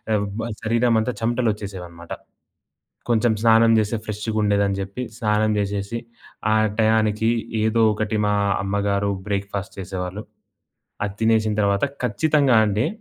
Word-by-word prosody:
ఎవ్ 105 Hz, -1 st, 0 dB, 0.2 s
మా 115 Hz, -, -3 dB, 0.2 s
శరీరమంతా 115 Hz, +1 st, +2 dB
చెమటలొచ్చేసేవనమాట. 100 Hz, -8 st, -3 dB, 1.0 s
కొంచెం 115 Hz, 0 st, +3 dB
స్నానం 115 Hz, 0 st, +5 dB
చేస్తే 110 Hz, +1 st, 0 dB
ఫ్రెష్షుగుండేదని 105 Hz, -2 st, 0 dB
జెప్పి, 100 Hz, +6 st, -4 dB
స్నానం 110 Hz, 0 st, +1 dB
చేసేసి, 100 Hz, +2 st, -2 dB, 0.5 s
ఆ -, -, +4 dB, 0.2 s
టయానికీ 110 Hz, 0 st, +2 dB, 0.3 s
ఏదో 110 Hz, +1 st, +2 dB
ఒకటి 110 Hz, +1 st, -2 dB
మా 105 Hz, -, +2 dB, 0.3 s
అమ్మగారు 100 Hz, 0 st, 0 dB, 0.2 s
బ్రేక్‌‌‌‌‌‌ఫాస్ట్ 100 Hz, -1 st, -4 dB
చేసేవాళ్ళు. 95 Hz, +2 st, -5 dB, 0.8 s
అది 100 Hz, -1 st, -4 dB
తినేసిన 110 Hz, -1 st, +2 dB
తర్వాత, 100 Hz, +4 st, +2 dB, 0.2 s
ఖచ్చితంగా 140 Hz, +2 st, +2 dB
అండి 105 Hz, +5 st, 0 dB
105 Hz, 110 wpm, -22 LUFS, 100-115 Hz, 1.0 s, స్నానం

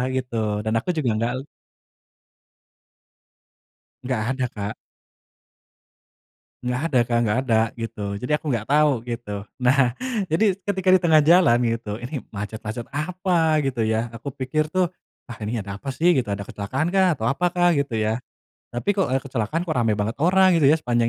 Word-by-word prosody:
gitu, 125 Hz, -2 st, -3 dB, 0.3 s
dan 110 Hz, -, 0 dB
aku 120 Hz, -, -7 dB
juga 140 Hz, -6 st, +1 dB
nggak 115 Hz, +2 st, 0 dB
le -, -, -4 dB, 2.6 s
Nggak 125 Hz, -3 st, -1 dB, 0.2 s
ada, 130 Hz, -1 st, 0 dB
Kak. 100 Hz, 0 st, -4 dB, 1.9 s
Nggak 125 Hz, +1 st, -1 dB
ada, 130 Hz, -, +4 dB
Kak, 120 Hz, -1 st, +2 dB
nggak 110 Hz, +2 st, +1 dB
ada 115 Hz, -, +4 dB, 0.2 s
gitu. 115 Hz, -2 st, -6 dB, 0.2 s
Jadi 125 Hz, -, -5 dB
aku 155 Hz, -, -11 dB
nggak 115 Hz, -3 st, -2 dB
tahu 150 Hz, +1 st, +5 dB, 0.2 s
gitu. 110 Hz, -4 st, -4 dB, 0.2 s
Nah, 125 Hz, 0 st, +3 dB, 0.4 s
jadi 165 Hz, +7 st, +2 dB, 0.2 s
ketika 190 Hz, -1 st, -2 dB
di 185 Hz, -, +5 dB
tengah 160 Hz, -2 st, +5 dB
jalan 165 Hz, -7 st, +6 dB
gitu, 115 Hz, -2 st, -2 dB
ini 125 Hz, +3 st, -5 dB
macet-macet 110 Hz, +2 st, -5 dB
apa 165 Hz, 0 st, +1 dB
gitu, 130 Hz, -4 st, -1 dB
ya. 110 Hz, +1 st, 0 dB
Aku 115 Hz, +5 st, -6 dB
pikir 150 Hz, +4 st, -2 dB
tuh, 185 Hz, -1 st, +2 dB, 0.4 s
"Wah, 120 Hz, -, -9 dB
ini 110 Hz, +3 st, -2 dB
ada 100 Hz, 0 st, -6 dB
apa 140 Hz, -, -8 dB
sih?" 175 Hz, +7 st, +3 dB
gitu, 125 Hz, -4 st, 0 dB
"Ada 100 Hz, 0 st, -3 dB
kecelakaankah? 170 Hz, -, 0 dB
Atau 110 Hz, -, -2 dB
apakah?" 175 Hz, +5 st, +2 dB
gitu 140 Hz, -5 st, -1 dB
ya. 110 Hz, +3 st, -1 dB, 0.5 s
Tapi 120 Hz, +12 st, -1 dB
kok 195 Hz, -1 st, 0 dB, 0.2 s
kecelakaan 135 Hz, +5 st, -2 dB
kok 165 Hz, -, -2 dB
ramai 110 Hz, -2 st, +1 dB
banget 105 Hz, +2 st, -1 dB
orang 185 Hz, +2 st, +5 dB
gitu 140 Hz, -, +5 dB
ya 155 Hz, -, +6 dB
sepanjang 120 Hz, -6 st, 0 dB
125 Hz, 160 wpm, -23 LUFS, 115-160 Hz, 2.6 s, jalan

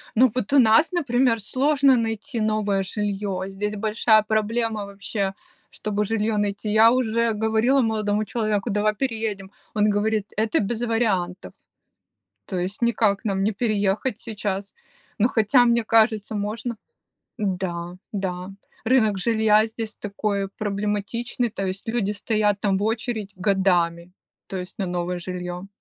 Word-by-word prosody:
Ну 255 Hz, +3 st, +6 dB
вот 255 Hz, +2 st, -2 dB
у 280 Hz, -, +7 dB
нас, 225 Hz, +8 st, +5 dB
например, 255 Hz, -8 st, +2 dB
сложно 275 Hz, +4 st, +3 dB
найти 230 Hz, +3 st, -2 dB
новое 210 Hz, -2 st, +1 dB
жилье, 200 Hz, -1 st, -3 dB
здесь 210 Hz, +2 st, -3 dB
большая 215 Hz, +1 st, +3 dB
проблема 220 Hz, 0 st, -1 dB
вообще, 200 Hz, 0 st, -3 dB, 0.4 s
чтобы 210 Hz, 0 st, -2 dB
жилье 220 Hz, 0 st, 0 dB
найти. 205 Hz, +1 st, -1 dB
Я 220 Hz, +2 st, +6 dB
уже 230 Hz, -2 st, +1 dB
говорила 220 Hz, +5 st, +2 dB
молодому 215 Hz, -2 st, 0 dB
человеку: 215 Hz, -1 st, -1 dB
"Давай 210 Hz, +1 st, +1 dB
переедем!" 220 Hz, -6 st, -3 dB, 0.2 s
Он 210 Hz, 0 st, +3 dB
говорит: 210 Hz, 0 st, 0 dB
"Это 220 Hz, 0 st, +1 dB
без 225 Hz, +3 st, -2 dB
вариантов." 200 Hz, -6 st, -1 dB, 0.9 s
То 185 Hz, -, -3 dB
есть 190 Hz, +6 st, -4 dB
никак 220 Hz, -4 st, +2 dB
нам 195 Hz, -2 st, 0 dB
не 215 Hz, -, +1 dB
переехать 210 Hz, +1 st, 0 dB
сейчас. 205 Hz, -3 st, -4 dB, 0.4 s
Ну 225 Hz, -, +4 dB
хотя, 245 Hz, +1 st, +4 dB
мне 235 Hz, -1 st, +2 dB
кажется, 220 Hz, -1 st, +2 dB
можно. 220 Hz, +3 st, -3 dB, 0.6 s
Да. 180 Hz, -4 st, -3 dB, 0.2 s
Да, 185 Hz, -2 st, -4 dB, 0.3 s
рынок 220 Hz, -5 st, +3 dB
жилья 220 Hz, 0 st, +3 dB
здесь 220 Hz, -1 st, -6 dB
такой 200 Hz, -1 st, -2 dB
проблематичный, 210 Hz, +4 st, -2 dB
то 195 Hz, -2 st, -4 dB
есть 190 Hz, +3 st, -4 dB
люди 225 Hz, -3 st, 0 dB
стоят 210 Hz, -1 st, 0 dB
там 195 Hz, -1 st, +1 dB
в 200 Hz, -, -2 dB
очередь 220 Hz, -2 st, -2 dB
годами, 180 Hz, -3 st, +1 dB, 0.4 s
то 190 Hz, -, -5 dB
есть 180 Hz, 0 st, -7 dB
на 195 Hz, -, -1 dB
новое 180 Hz, 0 st, -2 dB
жилье. 180 Hz, +1 st, -6 dB
210 Hz, 140 wpm, -23 LUFS, 195-225 Hz, 0.9 s, у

